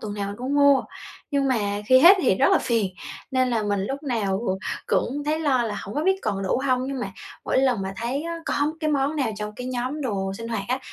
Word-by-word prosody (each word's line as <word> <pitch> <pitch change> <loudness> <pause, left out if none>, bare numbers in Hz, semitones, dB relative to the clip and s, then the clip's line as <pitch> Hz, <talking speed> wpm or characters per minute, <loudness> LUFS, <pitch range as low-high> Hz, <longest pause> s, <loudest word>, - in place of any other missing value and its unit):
tuần 210 -1 -5
nào 200 -1 -3
mình 200 - -6
cũng 260 +3 -2
mua. 285 -2 +5 0.5
Nhưng 280 -2 +1
mà 205 -5 0
khi 255 +2 +7
hết 360 +7 +9
thì - - +4
rất - - +3
là - - +5
phiền, 215 -6 0 0.4
nên 255 -1 +1
là 225 -3 0
mình 205 -1 0
lúc 275 +4 -4
nào 215 -8 -1 0.5
cũng 285 +4 0
thấy 305 +1 0
lo 265 -5 +2
là 210 -3 -3
hổng 200 - -8
có 300 - -1
biết 380 +1 +3
còn 195 -1 -2
đủ 190 - 0
hông. 255 -1 +1
Nhưng 275 -2 -3
mà - - -4 0.3
mỗi - - +1
lần 255 -6 +2
mà 190 0 -4
thấy 245 +5 -2
á, 335 0 -4
có 290 +2 0
cái 310 -1 0
món 285 +1 0
nào 260 -7 0
trong 210 0 -5
cái 250 - -6
nhóm 255 +4 -3
đồ 195 -8 -2
sinh 230 0 -6
hoạt 220 -4 -2
á, 255 +1 0
255 Hz, 255 wpm, -24 LUFS, 210-280 Hz, 0.5 s, hết